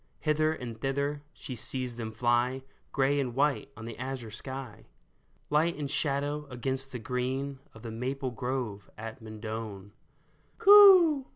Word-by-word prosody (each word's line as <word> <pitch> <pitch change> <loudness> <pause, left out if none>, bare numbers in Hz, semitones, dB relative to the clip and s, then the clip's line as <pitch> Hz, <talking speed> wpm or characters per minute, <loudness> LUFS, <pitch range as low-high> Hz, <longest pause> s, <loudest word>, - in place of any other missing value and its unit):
Hither 155 0 +2
and 120 -7 -6
thither 140 +2 -1
she 130 - -7
sees 125 +2 -3
them 115 -2 -5
fly, 120 +3 +1 0.3
Gray 140 +1 +2
and 125 -4 -2
white 140 +1 +1
on 110 - -8
the 115 0 -8
azure 130 -3 -5
sky. 130 +1 -7 0.6
Light 160 +3 +3
and 145 -2 -3
shadow 145 0 -1
against 130 +2 -1
the 125 - -4
green 130 +3 -3 0.2
Of 110 - -13
the 115 - -6
maple 130 +3 -3
grove 120 -5 -4
at 110 +1 -7
Mendon. 110 -2 -7 0.3
" - - -37
Coo 370 -9 +8
130 Hz, 150 wpm, -29 LUFS, 115-140 Hz, 0.6 s, Coo